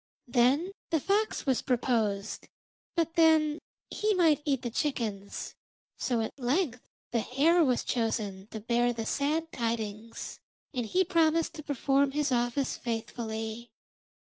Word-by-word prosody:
Then 265 +9 +3 0.2
the 325 - +2
fox 410 +7 0
was 265 -3 +2
proposed, 220 -5 0 0.5
but 330 -1 +1
then 315 -2 +4 0.3
he 425 -1 +1
might 320 -5 +4
eat 275 -4 0
the 240 - -3
chickens. 220 -8 -2 0.5
So 240 -3 0
at 225 - -5
length 255 0 0 0.2
the 235 - +2
hare 305 +9 +3
was 255 -5 +2
chosen 210 -5 -1
to 220 - -7
bear 240 +2 +1
the 225 -1 -4
sad 310 +6 0
tidings, 230 -1 -4 0.3
and 245 -4 -2
he 370 +10 +3
promised 330 -2 +2
to 305 - -8
perform 275 0 +1
his 295 -1 0
office 245 +2 0
faithfully. 225 0 -4
250 Hz, 135 wpm, -29 LUFS, 230-310 Hz, 0.5 s, then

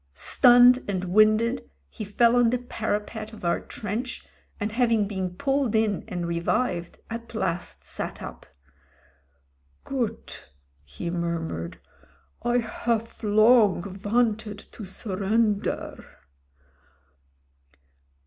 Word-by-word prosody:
Sttmned 245 - +6
and 185 -2 -1
winded 215 - +3 0.2
he 70 - -8
fell 230 +4 +3
on 245 -1 +5
the 250 - +1
parapet 220 -2 -4
of 210 - -9
our 170 - +2
trench, 225 +5 -5 0.3
and 210 0 -2
hav 240 +1 +2
ing 215 -3 +2
been 190 -3 -4
pulled 270 0 0
in 215 -3 +1
and 180 -5 -3
revived, 170 +2 -1
at 230 0 -7
last 175 -4 -3
sat - - -6
up. - - -9 1.4
"Goot, 245 - -4 0.3
he 70 - -6
murmured; 165 - -3 0.6
"I 240 +1 +1
hof 230 -1 -2
long 215 -2 +5
vanted 215 +1 0
to 215 - -9
surrender. 205 +2 -1
215 Hz, 105 wpm, -26 LUFS, 185-235 Hz, 1.4 s, Sttmned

